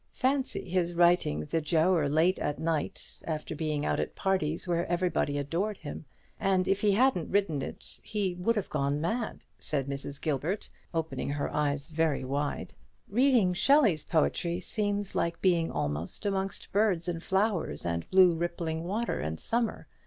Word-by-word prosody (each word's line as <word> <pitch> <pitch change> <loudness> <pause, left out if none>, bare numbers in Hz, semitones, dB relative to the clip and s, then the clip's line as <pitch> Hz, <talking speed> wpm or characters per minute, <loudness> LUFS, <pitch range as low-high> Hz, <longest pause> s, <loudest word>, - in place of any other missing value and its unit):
Fancy 265 -4 0
his 175 -1 0
writing 170 - +3
the 160 - -1
'Giaour' 160 0 +2
late 165 +5 +3
at 145 - -1
night, 160 -2 -3
after 155 -1 -3
being 150 -1 -1
out - - 0
at - - -3
parties 185 -4 0
where 170 0 0
everybody 175 -4 0
adored 170 +9 -1
him; 150 0 -7 0.3
and 190 -2 +2
if 195 - +1
he 205 -2 +4
hadn't 225 -6 +2
written 190 -8 +1
it, - - -7
he 205 -4 -1
would 180 +6 0
have 210 - -2
gone 140 0 0
mad," 220 +9 -2
said 140 -3 -2
Mrs. 140 0 -5
Gilbert, 160 +6 -1 0.2
opening 160 -6 -2
her 145 0 -2
eyes 145 -1 0
very 160 -4 0
wide. 140 +3 -2 0.4
"Reading 240 -5 +4
Shelley's 220 - +4
poetry 170 +1 +1
seems 205 0 -2
like 170 0 -1
being 170 -3 +2
amongst 190 - -3
birds 195 -5 +2
and 170 -2 -2
flowers 195 -1 0
and 85 -1 -2
blue 185 -2 +6
rippling 165 -1 -2
water 215 +7 -1
and 80 +1 -3
summer. 230 -1 -1
170 Hz, 155 wpm, -29 LUFS, 150-195 Hz, 0.4 s, blue